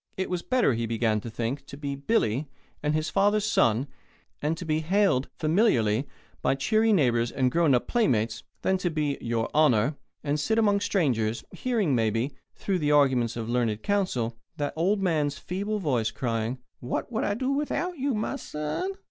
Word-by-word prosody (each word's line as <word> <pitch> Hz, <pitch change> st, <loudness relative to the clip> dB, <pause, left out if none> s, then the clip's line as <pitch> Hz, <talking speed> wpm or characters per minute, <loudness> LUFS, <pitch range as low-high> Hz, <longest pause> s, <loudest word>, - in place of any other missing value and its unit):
It 190 Hz, -, -2 dB
was 180 Hz, -1 st, -1 dB
better, 250 Hz, -, +2 dB
he 115 Hz, 0 st, -2 dB
began 110 Hz, -2 st, +1 dB
to 115 Hz, -, -6 dB
think, 115 Hz, +4 st, -3 dB
to 140 Hz, -, -9 dB
be 140 Hz, -1 st, -3 dB
"Billy" 140 Hz, -, 0 dB, 0.3 s
and 150 Hz, +1 st, 0 dB
his 155 Hz, +1 st, -1 dB
father's 205 Hz, +1 st, +3 dB
son, 120 Hz, -, +3 dB, 0.6 s
and 155 Hz, +2 st, 0 dB
to 180 Hz, -, -6 dB
be 155 Hz, -1 st, +1 dB
hailed 170 Hz, -5 st, +2 dB
familiarly 145 Hz, -, +2 dB, 0.3 s
by -, -, +2 dB
cheery 220 Hz, +11 st, +2 dB
neighbours 120 Hz, -, +3 dB
and 130 Hz, -2 st, +1 dB
grown 165 Hz, -4 st, +4 dB
up 120 Hz, -, 0 dB
playmates, 115 Hz, -, +1 dB, 0.2 s
than 190 Hz, 0 st, +2 dB
to 180 Hz, -, 0 dB
be 150 Hz, -3 st, -1 dB
"Your 115 Hz, -1 st, -1 dB
Honour," 145 Hz, -3 st, +3 dB, 0.3 s
and 150 Hz, 0 st, 0 dB
sit 220 Hz, +9 st, +1 dB
among 205 Hz, -3 st, +3 dB
strangers, 120 Hz, -, 0 dB
hearing, 225 Hz, -, 0 dB
maybe, 115 Hz, +3 st, +1 dB, 0.2 s
through 190 Hz, -2 st, -1 dB
the 150 Hz, -2 st, +1 dB
arguments 130 Hz, -6 st, +3 dB
of 115 Hz, -1 st, -4 dB
learned 115 Hz, -3 st, 0 dB
counsel, 125 Hz, -, 0 dB, 0.2 s
that 145 Hz, -1 st, -2 dB
old 195 Hz, +5 st, +1 dB
man's 150 Hz, -5 st, +1 dB
feeble 200 Hz, +4 st, -3 dB
voice 130 Hz, -, 0 dB
crying: 115 Hz, +1 st, -2 dB, 0.2 s
"What 125 Hz, -, -3 dB
would 225 Hz, -, -1 dB
I 205 Hz, -, 0 dB
do 255 Hz, +4 st, -1 dB
without 300 Hz, +4 st, -1 dB
you, 270 Hz, -2 st, 0 dB
my 215 Hz, +6 st, -2 dB
son?" 150 Hz, -, -3 dB
150 Hz, 180 wpm, -27 LUFS, 120-200 Hz, 0.6 s, grown